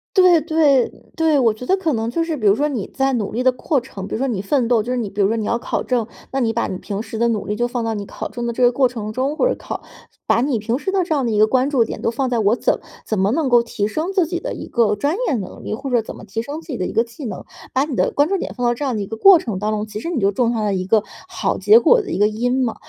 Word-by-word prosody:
对 360 -4 +6
对， 295 -5 +3 0.3
对， 320 -3 +3
我 230 -4 +3
觉 220 - -10
得 380 - +2
可 330 -6 0
能 225 0 -1
就 330 +8 0
是 325 -2 -2
比 215 -7 0
如 200 - +6
说 295 +4 +1
你 245 -9 -3
在 270 0 0
努 215 -5 -1
力 245 +3 -2
的 255 - +5
过 270 +3 0
程 200 -6 -8
比 - - -4
如 - - -1
说 270 - 0
你 215 -7 -2
奋 240 +3 +1
斗， 235 -3 +3
就 245 +4 -4
是 255 - 0
你 225 -4 -2
比 200 - -2
如 195 - +4
说 225 +2 0
你 215 - -2
要 235 - 0
考 - - -2
证， 240 -4 0 0.2
那 270 - -1
你 235 -3 +1
把 235 +1 -1
你 - - -4
平 205 +1 -4
时 220 0 -7
的 235 - +3
努 225 -3 -1
力 210 - -2
就 240 +2 0
放 240 -1 -3
到 225 - -1
你 205 -1 -4
考 - - -6
证 240 -1 -4
的 - - -1
这 250 - 0
个 245 - +6
过 255 +1 +3
程 215 -3 -6
中， 270 +5 -1
或 - - +3
者 - - +1
考 - - -6 0.4
把 235 - +3
你 270 -2 +1
平 230 +5 -2
时 385 - -2
的 380 -2 +2
这 330 - -1
样 280 -3 +1
的 230 - 0
一 210 - 0
个 215 - +6
关 255 +4 +1
注 255 -6 +3
点 - - -6
都 - - +1
放 255 +2 -2
在 235 - +1
我 215 +2 +3
怎 - - 0 0.3
怎 215 - -1
么 195 +2 +2
能 300 0 0
够 240 -1 +5
提 210 -3 -2
升 315 - -2
自 380 -3 +2
己 345 +2 -3
的 - - -4
一 - - -7
个 220 -4 +2
专 285 +9 0
业 290 - +1
能 195 -5 -6
力， - - -3
或 270 +3 -6
者 240 - +3
怎 220 - -9
么 - - -12
提 220 +2 -3
升 290 +6 -6
自 - - -20
己 265 - -4
的 185 - -2
一 - - -6
个 230 - +3
技 235 +5 -12
能， 215 -6 -6 0.3
把 265 - +2
你 290 -3 -4
的 - - +2
关 290 +1 +2
注 390 +2 0
点 - - -5
放 245 - -2
到 240 - +3
这 240 - -6
样 265 -4 -1
的 205 - -2
一 - - -4
个 220 +2 -7
过 390 - +8
程 220 -11 -4
当 210 +1 -1
中， 215 0 -2
其 210 0 -7
实 335 - -4
你 335 -7 -1
就 200 -1 +2
种 235 +3 +1
下 225 -2 -1
了 205 -2 0
一 185 -1 -2
个 215 0 +3 0.2
好 - - -2
结 445 +2 +7
果 485 -1 +5
的 405 - -9
一 - - -2
个 205 - +4
因 245 +4 0
嘛。 230 -3 -1
240 Hz, 365 characters per minute, -20 LUFS, 215-285 Hz, 0.4 s, 过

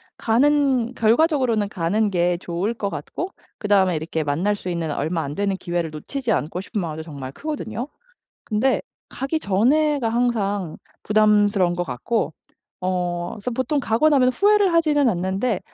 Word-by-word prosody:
가는 260 0 +2
결과적으로는 235 -3 +2
가는 200 +4 0
게 175 -1 +1
좋을 180 +7 -2
것 200 -3 -3
같고 330 - -5 0.3
그다음에 195 -4 +3
이렇게 160 0 -3
만날 170 +9 0
수 185 - -6
있는 170 -3 -2
얼마 160 +3 -1
안 140 +1 -5
되는 200 -1 0
기회를 175 -3 -2
놓치지 235 - -4
않고 175 0 -1
싶은 210 +2 -4
마음도 160 -3 -4
정말 140 -4 -8
크거든요. 285 -4 -5 0.5
근데 240 +5 +1 0.3
가기 275 +4 -2
전에가 260 +5 +2
항상 205 -7 -1 0.3
부담스러운 205 -4 +3
것 175 - -1
같고 175 - -2 0.5
어 175 -1 -1
그래서 225 +3 -4
보통 260 +5 0
가고 250 +5 +2
나면 265 -4 +4
후회를 405 +4 +3
하지는 300 -4 +3
않는데 190 +4 -1
210 Hz, 335 characters per minute, -22 LUFS, 175-255 Hz, 0.5 s, 나면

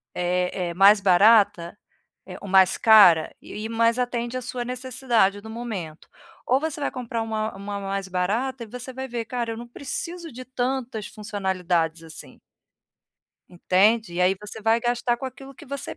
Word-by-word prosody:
é 180 0 -1
é - - -5
mais 200 +4 +6
barata? 200 -1 +4 0.5
É - - -8
ou - - -8
mais 190 -1 +5
cara?". 195 -8 +6
E - - -12
o - - -8
e 215 +1 -5
mas 230 +1 +2
atende 240 0 -2
a - - -4
sua 245 0 -5
necessidade 245 -5 0
do 220 - -11
momento. 215 -9 -6 0.4
Ou 260 +2 +3
você 310 0 -4
vai - - -1
comprar 235 -3 -4
uma 220 -1 -3
uma 200 +1 -5
mais 195 0 -4
barata 225 +8 -1
e - - -10
você 250 +3 -8
vai 265 +1 -5
ver: 240 -2 -4
"Cara, 235 0 -3
eu - - -8
não 240 +1 -8
preciso 335 +7 -6
de 255 +2 -8
tantas 250 -3 -3
funcionalidades 180 -5 -2
assim". 160 -1 -9 1.1
Entende? 190 +3 +2
E 175 - -2
aí 180 +1 +4
você 210 +1 -7
vai 225 +2 +3
gastar 240 0 0
com 265 - -6
aquilo 270 +1 -10
que 305 - -14
você 280 +1 -6
220 Hz, 180 wpm, -24 LUFS, 190-245 Hz, 1.1 s, mais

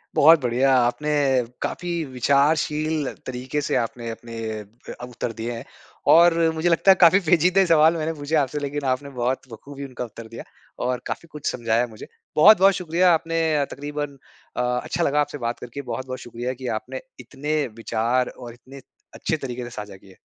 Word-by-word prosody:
बहुत 160 +2 +7
बढ़िया, 130 +2 +2
आपने 125 +5 +1 0.5
काफ़ी 170 -2 -2
विचारशील 150 +3 +1 0.2
तरीके 130 +3 -3
से - - -1
आपने 120 -1 -2
अपने 115 0 -9 0.5
अ, - - -10
उत्तर 120 -1 -5
दिए 115 +1 -4
हैं 115 0 -6 0.4
।और 170 +1 +7 0.2
मुझे 160 +2 0
लगता 170 +3 +5
है, - - +7
काफ़ी 180 +3 +7
पेचीदे 180 +4 +4
सवाल 165 0 +5
मैंने 160 +1 -2
पूछे 150 +1 -3
आपसे, 145 0 +1
लेकिन 145 0 -4
आपने 130 +2 -2
बहुत 130 0 -2
बखूबी 140 +5 -9
उनका 125 -2 -6
उत्तर 115 0 -11
दिया 115 +1 -9 0.4
और 125 -1 -1
काफ़ी 170 - -5
कुछ 150 -1 -10
समझाया 115 0 0
मुझे। 110 -2 -11 0.3
बहुत-बहुत 195 +3 +7
शुक्रिया, 180 0 +2
आपने 165 0 0 0.2
अ, 140 - +1
तकरीबन 145 0 -5 0.4
अ, 125 - +1 0.2
अच्छा 175 - -2
लगा 150 -1 +2
आपसे 145 0 -3
बात 120 -1 -3
करके। 125 +3 -7
बहुत-बहुत 130 -1 -5
शुक्रिया 120 +1 -5
कि 130 0 -8
आपने 130 +3 -8 0.2
इतने 140 +5 -4 0.2
विचार 115 +2 0
और 120 -2 -10
इतने 130 +3 -14 0.3
अच्छे 160 - -2
तरीके 125 -3 -5
से 120 - -7
साझा 105 -4 -8
किए। 95 0 -18
135 Hz, 175 wpm, -23 LUFS, 120-155 Hz, 0.5 s, बहुत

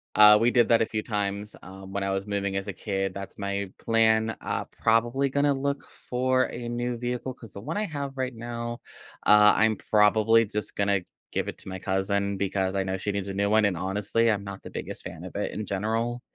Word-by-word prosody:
Uh, 105 0 +9
we 120 +1 +4
did 120 -2 +4
that 115 -1 +4
a - - +4
few 110 0 -3
times, 105 -1 -3
um, 95 +1 -10
when 100 - -1
I 95 - -1
was 95 +1 -2
moving 100 -1 -1
as 95 - -3
a 100 - -3
kid. 95 -2 -2
That's 100 0 -8
my 100 -1 -3
plan. 110 0 +2
Uh, - - -2
probably 120 +5 +2
gonna 140 +1 +2
look 140 +1 -2
for 130 +1 0
a 120 0 -6
new 120 0 -2
vehicle 125 +2 -3
'cause 115 -4 -13
the 100 - -8
one 160 - -4
I 215 - 0
have 140 -5 -5
right 130 -1 -2
now, 120 +1 -5 0.5
uh, 105 0 +7
I'm 110 -1 +3
probably 110 +2 +4
just 105 0 -4
gonna 100 -1 +1 0.3
give - - -1
it - - -5
to - - -8
my 95 0 -5
cousin 100 +1 0
because 95 0 -1
I 95 - +1
know 95 0 -2
she 100 +2 -2
needs 100 -1 -3
a - - -3
new 100 +1 +1
one, 110 +1 +4
and 95 -4 +1
honestly, 105 +5 +1
I'm 100 -2 0
not 100 -1 -8
the - - -8
biggest - - -6
fan - - -8
of - - -9
it - - -2
in 105 - -4
general. 115 +5 -1
105 Hz, 230 wpm, -27 LUFS, 100-120 Hz, 0.5 s, Uh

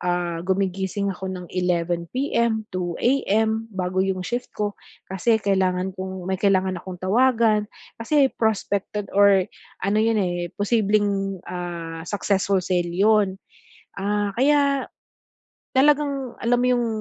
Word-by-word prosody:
ah, 175 -1 -1
gumigising 190 +1 -1
ako 190 +1 -6
ng 180 -1 -6
11:00, 180 - 0
2:00 220 +4 0
bago 185 -1 -1
'yong 190 -1 -1
shift 240 +5 -3
ko, 205 -1 -1 0.4
kasi 190 +5 +2
kailangan 190 -2 0
kong 185 0 -6
may 190 - 0
kailangan 190 -2 +2
akong 185 0 -8
tawagan. 225 0 +3 0.3
Kasi 275 +3 +3
prospected 210 -2 -1
or 200 -2 +5 0.4
ano 200 +2 +2
'yon 185 -6 0
posibleng, 205 -2 +1
ah, 170 -2 -5
successful 200 -1 +1
sale 175 -1 0
'yon. 200 0 +3 0.6
Ah, 205 0 -1
kaya 280 0 +2 0.9
talagang 280 -2 +2
alam 240 +1 +2
mo 250 - +2
yung 245 -1 +2
200 Hz, 115 wpm, -23 LUFS, 185-225 Hz, 0.9 s, or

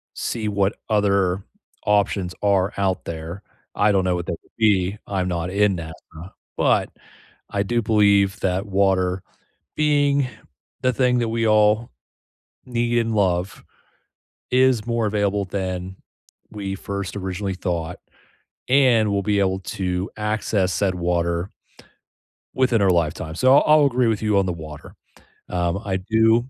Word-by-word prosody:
see 110 -3 -3
what 100 0 0
other 100 -3 +2 0.4
options 100 -3 +1
are 100 -1 +2
out 95 -2 -1
there. 85 +3 -6 0.3
I 105 0 +2
don't 95 -1 +2
know 90 -1 +1
what 85 -1 -4
that - - -3
would 85 - -12
be. 100 -3 +2
I'm 95 -2 -1
not 85 0 -2
in 100 0 +2
NASA. 80 -1 -7 0.6
But, - - +2 0.6
I 100 - 0
do 120 +3 0
believe 100 -2 +3
that 95 +1 0
water 95 -2 +1 0.5
being 145 -2 +2 0.5
the 130 0 +2
thing 125 0 +2
that 120 -1 0
we 115 0 0
all 110 +1 +3 0.8
need, 120 -1 0
and 115 -1 -1
love, 95 -2 0 0.9
is 125 -3 +3
more 115 -1 0
available 100 -1 0
than 95 -1 -4 0.6
we 100 -2 -4
first 100 0 -5
originally 95 0 -3
thought, 85 -3 -3 0.7
and 125 -5 +4
we'll 100 -1 0
be 105 0 +1
able 95 -1 +1
to 95 0 -3
access 105 -3 -1
that 95 -2 +1
water 85 +1 -1 1.0
within 125 -5 +2
our 95 - +4
lifetime. 85 -1 -1
So, 130 +6 +5
I'll - - +5 0.2
I'll 145 - +5
agree 125 -2 +1
with 110 -2 0
you 105 -2 +1
on 100 - +2
the 90 - -1
water. 80 -3 -10 0.6
Um, 90 +1 -1
I 95 -2 -1
do 110 +5 +2
100 Hz, 145 wpm, -22 LUFS, 90-110 Hz, 1.0 s, So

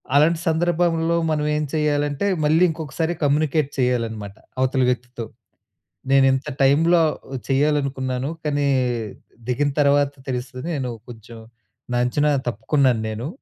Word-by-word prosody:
అలాంటి 160 +3 +4
సందర్భంలో 170 0 +1
మనం 150 -1 0
ఏం 150 - -1
చేయాలంటే 145 +2 0 0.2
మళ్ళీ 160 +4 +4
ఇంకొకసారి 160 +1 -3
కమ్యూనికేట్ 150 0 +1
చేయాలనమాట 115 -5 -1 0.2
అవతలి 130 0 +2
వ్యక్తితో. 125 -1 -3 0.9
"నేను 135 -1 +5
ఇంత 135 +1 -2 0.2
టైమ్‌లో 165 +5 +4 0.5
చేయాలనుకున్నాను. 135 -1 0
కానీ 145 -1 0 0.8
దిగిన 145 +4 +1
తర్వాత 140 0 +3 0.2
తెలుస్తుంది 125 +2 -4
నేను 130 -3 -3 0.2
కొంచెం 115 0 -11 0.5
నా - - +1
అంచనా 145 +4 +1 0.2
తప్పుకున్నాను 120 +2 +1
నేను. 110 +5 -5
140 Hz, 110 wpm, -22 LUFS, 125-155 Hz, 0.9 s, నేను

